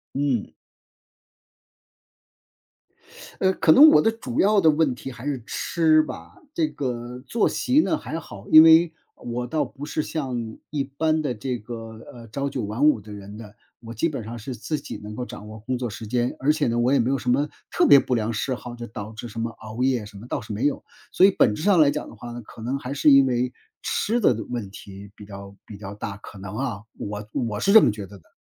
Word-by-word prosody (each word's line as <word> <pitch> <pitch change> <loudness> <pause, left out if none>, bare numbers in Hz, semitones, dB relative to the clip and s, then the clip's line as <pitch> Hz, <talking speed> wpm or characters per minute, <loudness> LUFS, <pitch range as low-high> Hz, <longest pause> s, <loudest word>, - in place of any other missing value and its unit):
嗯。 135 -5 -1 2.9
呃， 190 0 +3
可 160 - +4
能 300 - +9
我 - - +6
的 225 - +3
主 220 - -4
要 205 0 +4
的 160 -3 +5
问 150 -3 +1
题 135 +2 -8
还 125 +2 -10
是 135 -5 -2
吃 160 -2 +2
吧。 155 - -9 0.2
这 325 -3 +1
个 125 - -5
作息 250 +4 +2
呢， 320 - +1
还 160 - -5
好。 100 -7 -12
因 155 0 +10
为 160 +1 +6 0.2
我 120 +1 -4
倒 155 +5 0
不 145 +2 -9
是 155 - -2
像 125 -8 -4
一 140 -2 -1
般 155 +3 0
的 135 -5 -2
这 125 +3 -4
个， 115 +2 -8 0.4
呃， 115 -1 -12
朝 140 +5 -3
九 130 - -3
晚 110 +8 -1
五 150 -7 +4
的 105 +1 -12
人 100 0 -9
的。 105 -1 -11 0.3
我 115 - -7
基 120 +9 0
本 140 -7 -5
上 115 +2 -7
是 125 +3 -6
自 150 +7 -3
己 140 - -7
能 105 +1 -8
够 125 +1 -4
掌 105 - -10
握 110 - -9
工 125 +4 -3
作 120 -2 -3
时 110 +1 -8
间， 120 +2 -1
而 140 +3 +3
且 150 -4 0
呢， 115 0 0
我 120 +2 +2
也 140 - +4
没 120 - +1
有 135 - +1
什 125 - -6
么 140 +4 +2 0.2
特 - - +2
别 140 - +8
不 130 - 0
良 115 -1 -1
嗜 120 +4 -2
好， 120 -1 -8
就 120 - -7
导 105 -1 -7
致 110 +2 -8
什 115 +1 -6
么 115 - -2
熬 110 +3 -6
夜 125 -5 +1
什 105 - -13
么， 100 - -10
倒 - - -2
是 105 - -8
没 110 +7 0
有。 145 - -1 0.3
所 190 - +6
以 200 - +3
本 115 - +3
质 130 - -5
上 195 -4 +5
来 145 -2 +6
讲 150 - -4
的 - - -12
话 120 +2 -9
呢， 120 0 -7
可 110 +1 -13
能 130 +4 -2
还 135 0 -5
是 145 +1 +4
因 135 -1 +7
为 125 0 0 0.3
吃 235 +3 0
的 130 - +4 0.2
问 115 -6 -4
题 100 0 -11
比 105 - -11
较 100 -1 -10
比 105 - -9
较 100 -1 -8
大。 100 -1 -5
可 100 - -12
能 95 +1 -7
啊， 115 -5 -3
我 105 0 -6
我 115 -4 -2
是 160 - +2
这 220 - +10
么 - - +4
觉 105 -1 -6
得 100 +2 -13
的。 85 - -27
125 Hz, 255 characters per minute, -24 LUFS, 110-145 Hz, 2.9 s, 因